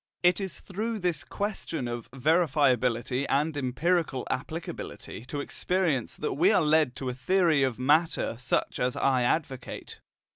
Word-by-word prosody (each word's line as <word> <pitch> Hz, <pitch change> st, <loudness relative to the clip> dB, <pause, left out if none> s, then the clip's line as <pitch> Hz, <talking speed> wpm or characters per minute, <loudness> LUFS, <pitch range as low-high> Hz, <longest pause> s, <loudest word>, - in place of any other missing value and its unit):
It 180 Hz, +2 st, +4 dB
is 190 Hz, -2 st, -5 dB
through 220 Hz, +4 st, -3 dB
this 175 Hz, -6 st, -1 dB
question 195 Hz, -, -3 dB
of 120 Hz, -1 st, -5 dB
verifiability 130 Hz, -4 st, +2 dB
and 150 Hz, +3 st, +1 dB
empirical 145 Hz, +1 st, 0 dB
applicability 155 Hz, -5 st, -5 dB
to 145 Hz, +2 st, -4 dB
experience 165 Hz, -5 st, -1 dB
that -, -, -2 dB
we -, -, +4 dB
are -, -, +4 dB
led 150 Hz, -4 st, +3 dB
to 130 Hz, -1 st, -4 dB
a -, -, -2 dB
theory 160 Hz, +3 st, +2 dB
of 130 Hz, -4 st, +1 dB
matter 150 Hz, +1 st, +2 dB
such 125 Hz, -, -1 dB
as 125 Hz, 0 st, 0 dB
I 130 Hz, -2 st, +2 dB
advocate. 130 Hz, 0 st, -2 dB
145 Hz, 145 wpm, -28 LUFS, 125-170 Hz, -, It